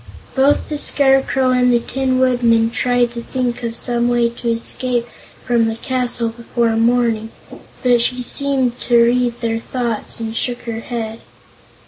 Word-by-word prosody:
Both 275 +2 +2
the 300 -1 -3
Scarecrow 270 -2 +2
and 250 0 +3
the 240 - +3
Tin 260 +2 -1
Woodman 235 -3 +2
tried 245 0 +1
to 235 0 -6
think 250 0 -3
of 230 -1 -4
some 240 -1 +1
way 240 -1 +2
to 235 0 -4
escape 235 +1 -1 0.4
from 235 -2 +2
the 225 - -2
castle 245 -1 -2
before 230 0 -1
morning, 230 -1 +1 0.5
but 245 -2 +4
she 250 +1 0
seemed 260 -1 +1
to 240 - +2
read 240 0 +1
their 225 -1 -1
thoughts 235 -2 -3
and 225 0 -4
shook 245 +1 -2
her 230 -1 -5
head. 230 -1 -5
240 Hz, 155 wpm, -18 LUFS, 230-250 Hz, 0.5 s, but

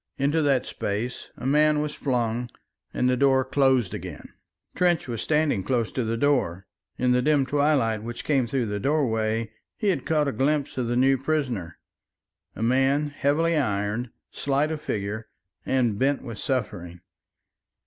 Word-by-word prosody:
Into 145 +4 +1
that 135 -4 +2
space 110 +5 -4
a - - -8
man 150 +2 +4
was 150 0 -2
flung 120 -2 -1 0.4
and 125 - 0
the 125 - +3
door 130 0 +3
closed 130 -6 +2
again. - - -7 0.4
Trench 175 -4 +1
was 115 -3 -3
standing 150 -10 +1
close 120 -2 0
to 130 - -1
the 115 +1 -1
door; 115 -10 +1 0.3
in 125 0 +2
the 125 0 +3
dim 145 0 +3
twilight 135 -6 +1
which 120 +2 -6
came 135 -5 +2
through 125 0 0
the 105 -1 -3
doorway 115 -5 0 0.3
he 210 - 0
had 165 -9 -1
caught 150 -2 +2
a - - +1
glimpse 140 +2 0
of 120 - -1
the 120 - 0
new 135 +1 +3
prisoner, 125 - -2 0.8
a 110 - -4
man 135 +5 +2
heavily 155 +4 +1
ironed, 105 -3 -1 0.2
slight 140 +2 0
of 155 -1 -4
figure, 105 0 -4 0.4
and 120 -6 +1
bent 140 +1 +1
with 115 -5 -7
suffering. 90 -10 -3
130 Hz, 160 wpm, -25 LUFS, 115-145 Hz, 0.8 s, man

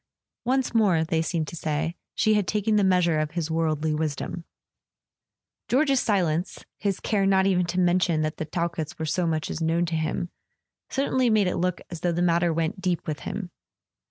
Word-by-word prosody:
Once 260 0 +1
more, 195 -8 +3
they 160 0 0
seemed 160 -1 -1
to - - -7
say, 160 +1 -2 0.2
she 215 -2 +3
had 210 -3 +1
taken 210 +1 +1
the 205 - +4
measure 180 -4 +3
of 155 -1 0
his 165 -2 -2
worldly 160 -1 0
wisdom. 155 +2 -3 1.2
George's 275 +1 +3
silence—his 190 0 -1
care 200 -2 +1
not 190 -1 +4
even 180 -2 +2
to 180 +1 -1
mention 175 -2 +2
that 155 0 -2
the 155 - -3
Talketts 170 -1 -3
were 160 - -3
so 170 +3 0
much 160 -1 -1
as 165 - -4
known 165 +2 +1
to 165 -1 -2
him—certainly 240 - -2
made 215 -2 +4
it 180 - -1
look 180 0 -1
as 170 - -5
though 175 - 0
the 175 +1 0
matter 170 0 +3
went 165 +3 -2
deep 180 -3 -1
with 150 -1 -3
him. 195 -3 -5
175 Hz, 185 wpm, -25 LUFS, 160-195 Hz, 1.2 s, the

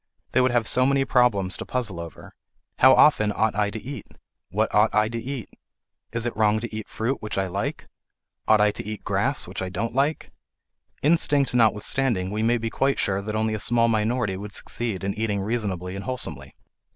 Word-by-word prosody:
They 130 - +3
would 130 - +3
have 120 -3 +1
so 130 +1 +4
many 135 0 +2
problems 105 -9 +2
to - - -5
puzzle 115 -9 -2
over: 85 -1 -9 0.5
How 130 +1 +7
often 110 -9 +5
ought 110 +1 +1
I 105 0 +1
to 110 - -6
eat? 135 +5 -8 0.4
What 110 +4 -1
ought 105 +1 +3
I 105 0 +3
to 115 - -4
eat? 130 -3 -5 0.6
Is 115 0 -2
it 120 - -2
wrong 110 0 +2
to 115 -2 -6
eat 110 -1 -6
fruit, 120 +5 -2
which 105 -2 -4
I 95 - +1
like? 95 +2 -4 0.6
Ought 110 -1 +5
I 105 0 +4
to - - -6
eat 105 0 -6
grass, - - 0
which - - -6
I 95 - -3
don't 105 +5 -3
like? 140 +4 0 0.7
Instinct 145 -3 +2
notwithstanding, 110 -3 +1
we 105 +1 -2
may 115 +2 +2
be 115 -1 -4
quite 135 0 +1
sure 95 0 0
that 105 +1 -4
only 110 0 0
a 110 - -2
small 115 +2 +3
minority 110 -2 0
would 100 +1 -8
succeed 110 -5 -4
in 100 0 -1
eating 105 -2 -1
reasonably 95 -4 -3
and 100 - -6
wholesomely. 80 - -4
110 Hz, 200 wpm, -24 LUFS, 100-120 Hz, 0.7 s, How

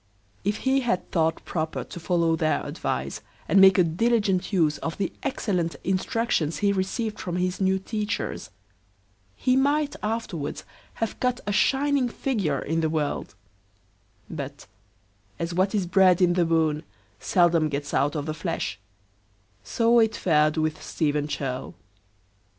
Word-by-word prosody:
If 205 +2 0
he 265 +1 +3
had 230 -9 -1
thought 160 -1 0
proper 160 -2 -3
to - - -9
follow 165 -1 +1
their 155 -1 0
advice, 65 +1 -3 0.3
and 195 - +5
make 190 -1 +8
a 180 - +6
diligent 195 +2 +1
use 160 -6 +2
of 165 - -4
the 195 - -2
excellent 180 -10 -1
instructions 190 - 0
he 200 -1 +2
received 205 +3 -2
from 175 -1 -4
his 180 +2 -1
new 190 0 +3
teachers, 210 +2 -3 0.9
he 255 - +1
might 285 +2 +2
afterwards 210 -9 -3 0.3
have 225 - -3
cut 250 0 0
a 205 - -1
shining 270 +3 +2
figure 205 - -1
in 160 +4 -1
the 160 - +1
world; 150 -9 -2 0.9
but, 145 -3 -7 0.7
as 170 +1 -3
what 190 +4 +1
is 195 -3 +1
bred 185 0 +4
in 180 -2 +4
the 175 -1 +2
bone, 160 -2 +1 0.4
seldom 170 -3 +3
gets 145 0 -4
out 145 +3 +1
of 145 -2 -2
the 155 - -2
flesh, 165 - -3 0.8
so 230 - +3
it 220 -1 +3
fared 155 -2 +2
with 155 0 -1
Stephen 150 -2 -1
Churl. 135 -3 -4
180 Hz, 145 wpm, -25 LUFS, 155-210 Hz, 0.9 s, make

